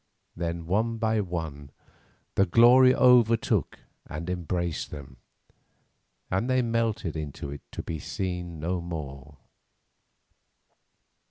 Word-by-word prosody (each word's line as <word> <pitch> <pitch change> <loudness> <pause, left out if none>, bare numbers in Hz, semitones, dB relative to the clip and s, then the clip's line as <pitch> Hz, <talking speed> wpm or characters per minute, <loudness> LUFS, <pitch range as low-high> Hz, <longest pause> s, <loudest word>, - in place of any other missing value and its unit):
Then 85 -1 -3
one 110 +6 0
by 110 -1 +1
one 80 -6 -5 0.6
the 100 - +3
glory 125 +6 +7
overtook 120 -3 +4 0.3
and 85 +5 -5
embraced 85 -1 -2
them, 70 -3 -10 1.1
and 95 +7 0
they 130 -1 +3
melted 115 -8 -1
into 75 -2 -5
it 70 - -7
to - - -6
be 80 -2 -5
seen 90 -2 -4
no 85 +3 -2
more. 75 -4 -7
90 Hz, 105 wpm, -27 LUFS, 80-115 Hz, 1.1 s, glory